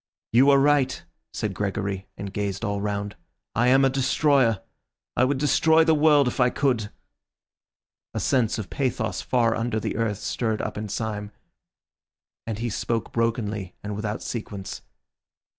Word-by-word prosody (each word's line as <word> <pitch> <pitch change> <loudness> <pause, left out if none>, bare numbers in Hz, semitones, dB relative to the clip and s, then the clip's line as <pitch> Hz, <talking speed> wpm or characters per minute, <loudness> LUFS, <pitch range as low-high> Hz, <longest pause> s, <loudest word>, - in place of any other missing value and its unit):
'" - - -66
"You 130 +4 +6
are 140 - +7
right," 140 -1 +2 0.3
said 105 -2 -3
Gregory, 100 0 -3
and 100 0 -6
gazed 100 +1 -2
all 100 -1 -1
round. 100 0 -3 0.4
"I 115 +3 +2
am 135 +2 +5
a - - +4
destroyer. 130 -4 +2 0.5
I 125 - +4
would 135 +1 0
destroy 160 +3 +4
the 160 0 +4
world 150 -2 +5
if 125 - -3
I 125 0 +5
could." 120 -7 0 1.3
A - - 0
sense 120 -5 +1
of 110 - -3
a - - -26
pathos 130 -2 -1
far 120 -3 +2
under 115 -1 -1
the - - -3
earth 110 -3 0
stirred 110 +1 -2
up - - -4
in 105 0 -5
Syme, 105 -1 -3 1.2
and 110 -2 -3
he 120 +2 -2
spoke 115 +2 -2
brokenly 110 -5 -1
and 105 0 -4
without 105 0 -3
sequence. 105 -4 -5
115 Hz, 160 wpm, -25 LUFS, 105-130 Hz, 1.3 s, are